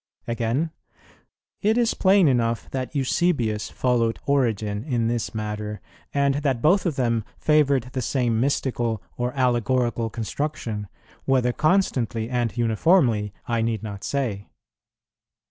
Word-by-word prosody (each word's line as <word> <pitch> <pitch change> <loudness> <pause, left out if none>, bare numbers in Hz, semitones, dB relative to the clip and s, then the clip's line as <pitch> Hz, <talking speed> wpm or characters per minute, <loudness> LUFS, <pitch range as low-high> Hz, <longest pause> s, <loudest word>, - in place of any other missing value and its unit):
"[25:2] - - -4
Again, 120 +7 -1 0.9
"It 220 +2 +2
is 235 -1 +2
plain 190 -2 +4
enough 115 -4 0
that 130 +2 -4
Eusebius 125 -7 0
followed 115 -4 +1
Origen 110 -7 0
in 120 -5 0
this 115 -1 -2
matter, 105 -1 -4 0.3
and 140 -1 +2
that 135 -5 0
both 180 - +3
of 160 - -1
them 115 -4 +1
favoured 145 -4 +3
the 130 - -1
same 120 -2 0
mystical 120 -5 0
or 125 0 -1
allegorical 120 -2 +1
construction; 115 -2 -4 0.4
whether 125 -2 +2
constantly 125 - +1
and 120 -2 -1
uniformly 115 - +3 0.2
I 115 -2 0
need 115 -1 -1
not 100 -2 -6
say." 120 -8 -2
120 Hz, 130 wpm, -24 LUFS, 115-140 Hz, 0.9 s, plain